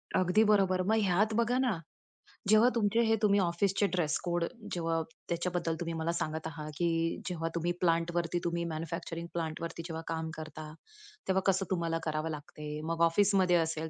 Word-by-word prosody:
अगदी 185 +4 +4
बरोबर. 190 -3 +4
मग 220 - +3
ह्यात 200 +4 +2
बघा 235 +2 +2
ना, 245 -9 +1 0.7
जेव्हा 215 +3 +7
तुमचे 225 0 +2
हे 225 0 +4
तुम्ही 205 -1 +5
ऑफिसचे 195 +3 +2
ड्रेस-कोड, 175 +1 0 0.3
जेव्हा 165 -1 0 0.3
त्याच्याबद्दल 170 -1 -1
तुम्ही 170 -1 -3
मला 160 +1 -1
सांगत 160 +1 -3
आहात. 155 -2 -6
की 165 -1 0
जेव्हा 165 -2 -2
तुम्ही 170 +1 0
प्लांटवरती 170 0 +1
तुम्ही 170 0 -1
मॅन्युफॅक्चरिंग 165 +1 -4
प्लांटवरती 165 0 -4
जेव्हा 160 -1 -5
काम 160 -1 -2
करता, 155 0 -7 0.6
तेव्हा 190 0 +2
कसं 190 0 -1
तुम्हाला 170 -2 0
करावं 155 0 -1
लागते? 150 0 -6
मग 165 0 -2
ऑफिसमध्ये 190 -1 +3
असेल 160 -1 0
170 Hz, 155 wpm, -31 LUFS, 165-190 Hz, 0.7 s, जेव्हा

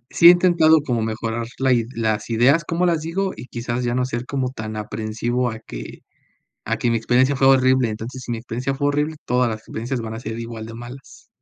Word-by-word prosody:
sí 170 - +4
he - - +13
intentado 170 -3 +5
como 120 -6 -1
mejorar 115 +1 -3
la 130 -1 +3
ide 115 -2 +1
las 110 -1 -1
ideas, 130 +8 +4
¿cómo 170 +3 0
las 170 -2 +2
digo? 190 +4 -2
Y 120 - -9
quizás 120 0 -3
ya 120 0 0
no 125 0 +1
ser 120 -1 -4
como 130 -2 -2
tan 110 -3 -6
aprensivo 115 +3 -2
a 110 - -7
que - - -9 0.7
a - - 0
que 120 - 0
mi 115 - +2
experiencia 130 +5 +2
fue 135 - +4
horrible. 130 -2 +4
Entonces, 115 +4 -6
si 120 - -5
mi 115 - -2
experiencia 125 +3 -3
fue 145 +1 0
horrible, 150 +2 0
todas 125 -1 +2
las 110 - -4
experiencias 120 +4 -4
van 110 -1 -5
a - - -6
ser 115 -1 -5
igual 115 -1 -6
de 115 - -9
malas. 120 +3 -11
120 Hz, 225 wpm, -21 LUFS, 115-135 Hz, 0.7 s, he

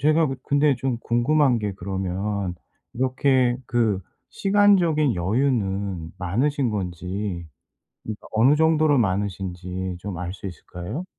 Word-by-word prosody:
제가 155 +2 +4 0.2
근데 145 0 +3
좀 125 -2 -2
궁금한 125 +2 +2
게 105 -2 -2
그러면 95 +1 -3 0.4
이렇게 130 0 +2
그 110 -5 +1 0.3
시간적인 185 - +3
여유는 95 -4 -1
많으신 125 +8 0
건지 90 -1 -4 0.6
그러니까 110 -1 -7
어느 120 +6 +5
정도로 155 -3 +4
많으신지 95 -3 -2
좀 95 -2 -5
알 90 0 -4
수 100 - -8
있을까요? 90 - -6
110 Hz, 255 characters per minute, -24 LUFS, 95-140 Hz, 0.6 s, 어느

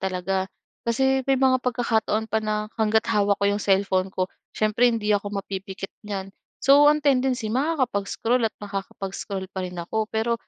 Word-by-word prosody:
talaga. 190 0 -1 0.4
Kasi 265 +3 +2
may 270 - +4
mga 260 -1 +3
pagkakataon 225 -3 0
pa 220 - +2
na, 215 0 -2
hangga't 220 0 +3
hawak 205 -1 +3
ko 200 - +2
'yong 205 +1 0
cellphone 190 -1 +2
ko 185 - 0 0.3
siyempre 215 +3 +3
hindi 215 -3 0
ako 205 0 0
mapipikit 195 0 -6
niyan, 195 -2 -5 0.3
so 280 +2 +6
ang 300 0 +2
tendency 255 -4 +2
makakapag-scroll 250 -4 0
at - - -37
makakapag-scroll 195 -1 -5
pa 190 - -2
rin 180 0 -7
ako. 215 +6 -2
Pero 225 +1 +1
215 Hz, 160 wpm, -24 LUFS, 195-245 Hz, 0.4 s, so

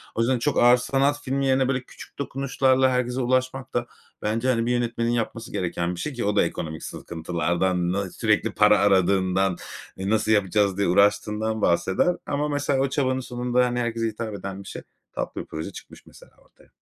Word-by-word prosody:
O - - -3
yüzden 125 +2 +2
çok 145 +4 0
ağır 120 +1 +7
sanat 140 +3 0
filmi 135 0 -1
yerine, 130 -1 +3
böyle, 130 -1 0
küçük - - -14
dokunuşlarla 130 -1 +2
herkese 125 0 -1
ulaşmak 130 +1 -1
da 120 0 0 0.4
bence, 115 +4 -1
hani, 115 -3 +2
bir 120 - 0
yönetmenin 120 -1 0
yapması 115 -1 -3
gereken 85 0 -2
bir - - -9
şey 150 - -3
ki 120 -3 -3
o 105 0 0
da - - +5
ekonomik 80 -2 -4
sıkıntılardan, 85 +2 -1
na 100 0 -2
sürekli 110 +2 +1
para 105 0 +4
aradığından, 95 -1 +2 0.4
"E, 95 +1 -3
nasıl 110 0 +1
yapacağız?" 100 -1 +2
diye 100 - +1
uğraştığından 105 +3 +2
bahseder. 95 - +2
Ama 145 +1 -1
mesela 145 -1 0
o 135 0 +1
çabanın 130 -1 0
sonunda, 125 0 0
hani, 125 0 -1
herkese 115 -1 -1
hitap 110 0 -5
eden 100 0 -6
bir - - -14
şey, - - -7 0.3
tatlı - - -4
bir - - -10
proje 80 0 -6
çıkmış - - -13
mesela - - -17
ortaya. - - -25
115 Hz, 190 wpm, -24 LUFS, 100-130 Hz, 0.4 s, ağır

